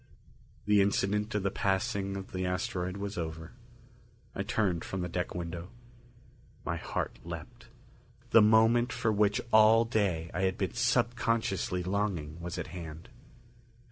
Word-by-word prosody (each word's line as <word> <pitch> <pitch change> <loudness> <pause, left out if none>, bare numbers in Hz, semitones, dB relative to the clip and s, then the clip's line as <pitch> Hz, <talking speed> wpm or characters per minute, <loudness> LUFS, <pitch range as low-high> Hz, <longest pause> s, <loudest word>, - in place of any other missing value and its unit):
The 105 -1 +5
incident 105 +2 +1
of 105 - 0
the 100 - 0
passing 100 0 -1
of 95 - -8
the 95 0 -3
asteroid 90 0 -2
was 100 -1 -4
over. 80 0 -5 0.8
I - - -3
turned 95 -6 0
from 95 - -4
the 90 - -2
deck 90 +1 -3
window. 85 +1 -5 1.0
My - - -1
heart - - -4
leaped. - - -9 0.6
The 115 - +8
moment 115 +3 +5
for 110 - 0
which 105 +2 +2
all 110 +1 +7
day 95 -8 0
I 90 - -1
had 95 -1 +1
been 95 -4 -2
subconsciously 115 -6 +1
longing 90 -5 -2
was 85 +1 -5
at - - -3
hand. 85 +2 -8
100 Hz, 140 wpm, -30 LUFS, 90-110 Hz, 1.0 s, The